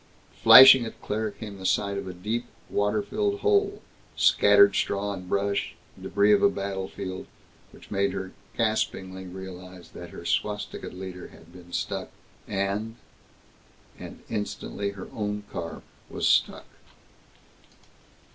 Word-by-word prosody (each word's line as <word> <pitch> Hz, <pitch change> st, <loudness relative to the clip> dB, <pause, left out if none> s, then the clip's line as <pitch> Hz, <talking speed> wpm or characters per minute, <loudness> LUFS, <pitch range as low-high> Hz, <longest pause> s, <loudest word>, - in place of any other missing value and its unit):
Flashing 130 Hz, -1 st, +10 dB
at 115 Hz, -, -8 dB
Claire 110 Hz, +1 st, -2 dB
came 100 Hz, -1 st, -9 dB
the -, -, -9 dB
sight 100 Hz, -1 st, 0 dB
of 100 Hz, -, -5 dB
a 90 Hz, -, -6 dB
deep, 110 Hz, +6 st, -3 dB, 0.2 s
water 105 Hz, +1 st, 0 dB
filled 405 Hz, -1 st, -2 dB
hole, 410 Hz, -1 st, +1 dB, 0.3 s
scattered 400 Hz, 0 st, +5 dB
straw 100 Hz, 0 st, -1 dB
and 90 Hz, -2 st, -9 dB
brush, 100 Hz, +1 st, -1 dB, 0.3 s
débris 100 Hz, +1 st, +3 dB
of -, -, +4 dB
a 200 Hz, -, +5 dB
battlefield, 95 Hz, -, -5 dB, 0.4 s
which -, -, -17 dB
made 100 Hz, -1 st, +1 dB
her 95 Hz, 0 st, -5 dB, 0.3 s
gaspingly 95 Hz, -4 st, -2 dB
realize 90 Hz, -1 st, -10 dB
that 85 Hz, -, -10 dB
her 85 Hz, -, -11 dB
swastikaed 105 Hz, +3 st, -3 dB
leader 90 Hz, 0 st, -8 dB
had 80 Hz, +1 st, -18 dB
been 90 Hz, -1 st, -14 dB
stuck -, -, -3 dB, 0.4 s
and 100 Hz, +3 st, -2 dB, 1.0 s
And -, -, -10 dB
instantly 105 Hz, -1 st, -4 dB
her 100 Hz, -2 st, -9 dB
own 105 Hz, -1 st, -3 dB
car 85 Hz, -1 st, -6 dB, 0.3 s
was -, -, -1 dB
stuck. -, -, +2 dB
100 Hz, 130 wpm, -26 LUFS, 95-110 Hz, 1.0 s, Flashing